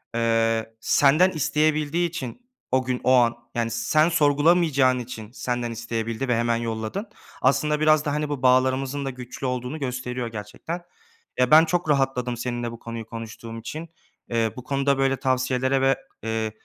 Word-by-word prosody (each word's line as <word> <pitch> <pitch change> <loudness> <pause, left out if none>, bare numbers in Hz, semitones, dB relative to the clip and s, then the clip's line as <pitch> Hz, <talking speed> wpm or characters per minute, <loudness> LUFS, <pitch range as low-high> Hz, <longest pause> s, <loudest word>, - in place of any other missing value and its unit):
eee, 115 -1 +1
senden 150 +10 +4
isteyebildiği 155 +2 +1
için 160 - -6 0.3
o 130 0 +3
gün 125 -1 -2
o 130 - +3
an, 120 -2 +4 0.2
yani, 115 -1 0
sen 155 +8 +2
sorgulamayacağın 145 -4 +3
için 115 -2 -8
senden 120 -2 -3
isteyebildi 115 +2 -3
ve 125 - +2
hemen 115 0 +1
yolladın. 115 - -3 0.3
Aslında 145 +3 +2
biraz 155 0 +4
da, 145 - 0
hani, 150 0 -1
bu 145 -3 -3
bağlarımızın 130 +2 +2
da 135 - -1
güçlü 125 +1 -7
olduğunu 125 +4 -3
gösteriyor 125 -2 -3
gerçekten. 115 - -6 0.6
Ya, 125 +1 +3
ben 160 +2 +8
çok 175 -1 -1
rahatladım 135 -4 +1
seninle 120 -1 -3
bu 115 - -10
konuyu 115 -1 -7
konuştuğum 115 0 -8
için, 160 +7 -7 0.4
eee, 115 -2 0
bu 125 - -8
konuda 140 +1 +1
böyle 135 0 +2
tavsiyelere 130 0 +1
ve, 135 0 +4 0.3
eee, 110 -1 -2
130 Hz, 160 wpm, -24 LUFS, 115-145 Hz, 0.6 s, ben